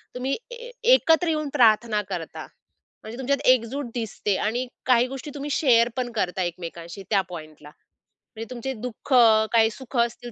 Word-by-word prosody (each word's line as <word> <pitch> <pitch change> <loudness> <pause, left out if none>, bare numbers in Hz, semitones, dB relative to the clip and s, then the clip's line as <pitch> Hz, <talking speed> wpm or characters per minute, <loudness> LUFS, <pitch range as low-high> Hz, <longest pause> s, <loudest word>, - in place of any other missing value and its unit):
तुम्ही 260 +2 -1 0.2
ए 485 +1 -10 0.2
एकत्र 340 -7 +4
येऊन 305 -2 -1
प्रार्थना 220 -2 +4
करता. 170 -3 -6 0.6
म्हणजे 220 +3 -8
तुमच्यात 275 +1 0
एकजूट 255 +3 +2
दिसते 210 -3 -2
आणि 245 +4 -2 0.2
काही 250 -1 +4
गोष्टी 270 +3 -7
तुम्ही 285 +1 -5
शेअर 245 -5 +4
पण 250 -1 -2
करता 185 -3 -1
एकमेकांशी 170 +2 -7
त्या 200 -3 +3
पॉइंटला. 155 -3 -10 0.7
म्हणजे 225 +1 -7
तुमचे 255 +2 -4
दुःख, 250 +3 -5 0.4
काही 225 -1 +5
सुख 260 +2 -8
असतील 240 0 -1
235 Hz, 150 wpm, -24 LUFS, 210-265 Hz, 0.7 s, काही